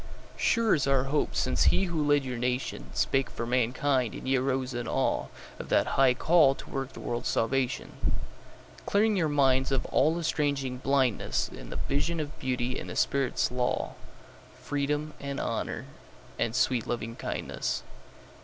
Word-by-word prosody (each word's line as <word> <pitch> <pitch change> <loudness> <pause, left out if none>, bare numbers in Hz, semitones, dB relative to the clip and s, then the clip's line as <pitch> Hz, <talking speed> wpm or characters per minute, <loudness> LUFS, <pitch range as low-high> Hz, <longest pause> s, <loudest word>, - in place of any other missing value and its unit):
Sure 230 -2 +3
is 140 -3 +1
our 135 -1 +3
hope 140 +2 0
since 130 - +2
he - - +4
who 170 -4 0
led 145 -1 +3
your 125 -1 -3
nationSpake 125 +1 -1
for 115 - -4
mankind, 125 +1 +1
and - - -7
ye 135 - +3
arose 130 0 0
in 120 -1 -3
aweOf - - 0 0.3
that - - +2
high 130 -2 +5
call 155 -2 +5
to - - -11
work 135 -1 -3
the - - -9
world's 120 +1 -3
salvation; 125 +1 0 1.0
Clearing 210 +1 +3
your 165 -5 +1
minds 135 -2 +3
of 135 - +1
all 155 +4 +3
estranging 140 -6 -1
blindnessIn 130 - 0
the - - -6
vision 160 +4 -1
of 150 -1 -5
Beauty 125 -1 -1
and - - -7
the - - -6
Spirit's 135 -3 +1
law, 125 0 -1 0.7
Freedom 145 +2 -2
and 140 -1 -4
Honour - - -3 0.5
and 115 0 0
sweet 125 -3 +1
Lovingkindness. 115 -1 -3
135 Hz, 150 wpm, -28 LUFS, 125-145 Hz, 1.0 s, high